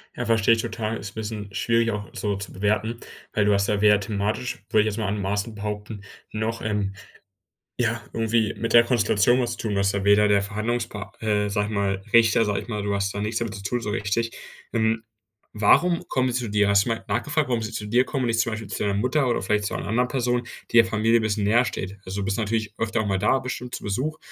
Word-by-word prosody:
Ja, - - -3
versteh 115 -2 +3
ich 115 0 +4
total. 110 0 -3
Ist 100 -1 -7
'n - - -25
bisschen 105 -2 -5
schwierig, 115 +2 +1
auch 105 -1 -5
so 105 -2 -2
zu 100 0 -7
bewerten, 110 +4 -1 0.3
weil 105 - +2
du 105 - +4
hast 100 0 +2
ja 105 -1 +1
weder 105 -1 +5
thematisch, 105 +4 -2
würde 110 - +4
ich - - 0
jetzt - - -6
mal 105 - -1
anmaßend 100 +2 -2
behaupten, 105 0 -5 0.3
noch, 110 +1 -2
ähm, 105 -2 -1 0.9
ja, 115 -1 0
irgendwie 115 -1 +1
mit 115 - -3
der 120 - +8
Konstellation 120 -1 +3
was 120 -1 -2
tun, 110 -2 -2
du - - -1
bist 100 0 +2
da 100 - -2
weder 105 +1 +5
der 100 -1 +4
Verhandlungspa 105 -1 -3
äh, 105 -2 0
sag 105 0 0
ich - - -6
mal 100 -2 -1
Richter, 115 -1 +5
sag 105 -1 0
ich - - -14
mal 105 -2 -3
du 100 0 -1
hast 100 0 -1
da 100 - -3
nichts 110 +2 -1
damit 115 -2 -3
zu 100 - -8
tun, 120 +4 -1
so 105 - -3
richtig. 105 +3 -1 0.4
Ähm, 110 0 +1 0.5
warum 170 +12 +3
kommen 130 -1 +1
sie 120 - 0
zu 115 - -4
dir? 105 0 +2
Hast 100 +1 +4
du - - -1
mal 115 -1 -2
nachgefragt, 140 +7 0
warum 120 -2 0
sie 110 - -5
zu 110 -1 -4
dir 120 +4 +3
kommen 135 -2 -2
und - - 0
nicht 115 0 +2
zum 115 +1 0
Beispiel 110 -2 -5
zu - - -3
deiner 100 -1 0
Mutter 125 +6 +1
oder 120 - 0
vielleicht 105 +2 0
zu - - -3
einer - - -4
anderen 125 +3 +1
Person, 125 -1 0 0.3
die - - +2
der 115 - +7
Familie 115 +2 +2
bisschen 110 -1 -1
näher 115 +4 +4
steht? 95 +1 -5
Also, 100 +2 -3
du - - -2
bist 100 0 -1
natürlich 110 -1 -1
öfter 110 -1 0
auch 105 - -3
mal 95 -1 0
da 105 +6 +2
bestimmt 125 -1 -5
zu - - -6
Besuch, 135 +10 -2
110 Hz, 250 wpm, -24 LUFS, 100-115 Hz, 0.9 s, der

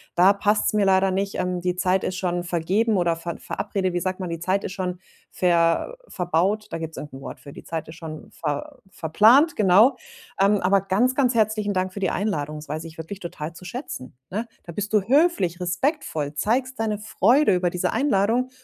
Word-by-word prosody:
da 185 +3 +6
passt's 205 +2 +1
mir 205 -2 +3
leider 190 0 +4
nicht, 195 +2 -2
ähm, 180 0 -1
die 180 0 -1
Zeit 185 +1 +1
ist 185 - -2
schon 175 -1 -1
vergeben 190 +6 +1
oder 170 -2 +2
ver 165 0 -6
verabrede 195 -3 -2
wie 175 - 0
sagt 185 0 -2
man, 185 - -4
die 165 -1 -4
Zeit 185 +3 0
ist 190 - -4
schon 180 -2 -3 0.3
ver 170 - +2
verbaut. 185 +4 0
Da - - -3
gibt's 160 -1 -6
irgend 150 - -8
'n 135 - -9
Wort - - -8
für. 140 - -12
Die - - -11
Zeit 165 -2 -5
ist 160 - -10
schon 155 -2 -9
ver 145 -3 -4
verplant, 225 - +4
genau. 210 +5 +5 0.5
Ähm, 200 +1 +4
aber 190 +1 +3
ganz, 225 +7 +1
ganz 260 -3 +2
herzlichen 215 -2 +1
Dank 185 0 -1
für - - -6
die 190 - +1
Einladung. 155 -8 -2
Das 150 - -10
weiß 155 +1 -3
ich 160 0 -11
wirklich 175 +5 -7
total 165 -2 -6
zu 165 - -13
schätzen, 155 - -7
ne? 220 +5 -3 0.2
Da 170 - -9
bist 205 +3 -4
du 210 - +5
höflich, 250 - +2
respektvoll, 180 - -1
zeigst 250 - 0
deine 215 -2 -1
Freude 220 +5 +3
über 180 0 +1
diese 180 - -1
Einladung 240 -1 +1
185 Hz, 205 wpm, -24 LUFS, 170-215 Hz, 0.5 s, da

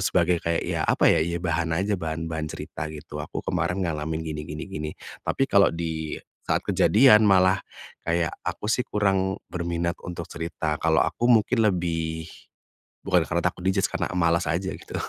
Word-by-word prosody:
sebagai 90 -2 +2
kayak 85 0 0
ya - - -2
apa - - +4
ya? - - +4
Ya 85 +1 -2
bahan 80 -1 0
aja 100 +4 0
bahan-bahan 80 -1 -3
cerita - - -6
gitu, 75 -2 -8
"Aku - - -5
kemarin 90 +3 -1
ngalamin 80 -1 -2
gini 75 -1 -4
gini 75 +2 -6
gini," 75 -5 -4 0.4
tapi 135 - +1
kalau 100 0 +5
di 80 -2 -3 0.3
saat - - +1
kejadian 110 -2 +6
malah 95 -1 +5 0.5
kayak 85 -1 +1 0.2
aku 105 - -3
sih 125 - +2
kurang 95 -2 +1 0.2
berminat 85 -1 -2
untuk 85 -1 -6
cerita 80 -2 -3
kalau 80 -1 +4
aku 120 - -1
mungkin 115 0 +4
lebih, 80 -3 -1 0.8
bukan 90 -4 +3
karena 85 0 -1
takut 90 - -5
di-judge 95 -1 +2
karena - - -2
malas 85 0 +2
aja 85 +5 -1
gitu - - -9
85 Hz, 165 wpm, -25 LUFS, 80-95 Hz, 0.8 s, kejadian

